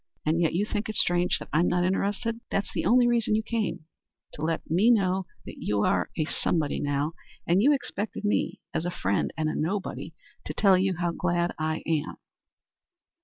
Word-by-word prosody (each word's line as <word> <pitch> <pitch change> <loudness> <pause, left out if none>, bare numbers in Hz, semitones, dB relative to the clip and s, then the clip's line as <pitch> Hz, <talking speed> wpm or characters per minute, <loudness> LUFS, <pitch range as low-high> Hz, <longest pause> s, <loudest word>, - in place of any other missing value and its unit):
And 160 +3 +2
yet 165 - +2
you 200 +4 +2
think 210 0 -3
it 215 - -4
strange 175 0 +2
that - - -10
I'm 165 +4 +3
not 175 0 +2
interested. 205 +5 -1
That's 200 - -2
the - - -1
only 245 +1 +5
reason 235 -3 +2
you 220 - 0
came 220 -8 -2 0.5
to - - -9
let 160 +1 -1
me 185 +9 +3
know 190 -5 +2 0.2
that - - -9
you 105 0 0
are 90 -1 +1
a 155 - +1
somebody 155 -2 -1
now; 145 +2 -1 0.3
and 175 +3 +3
you 280 +7 +5
expected 220 -6 -2
me, 205 - 0
as - - -1
a 175 - -1
friend 100 - -1
and 155 -1 0
a 155 - -1
nobody, 165 -1 -3 0.3
to 150 - -5
tell 195 -3 +5
you 185 0 +1
how 175 0 0
glad 175 0 0
I 155 0 -1
am." 160 -2 -1
175 Hz, 195 wpm, -27 LUFS, 160-205 Hz, 0.5 s, only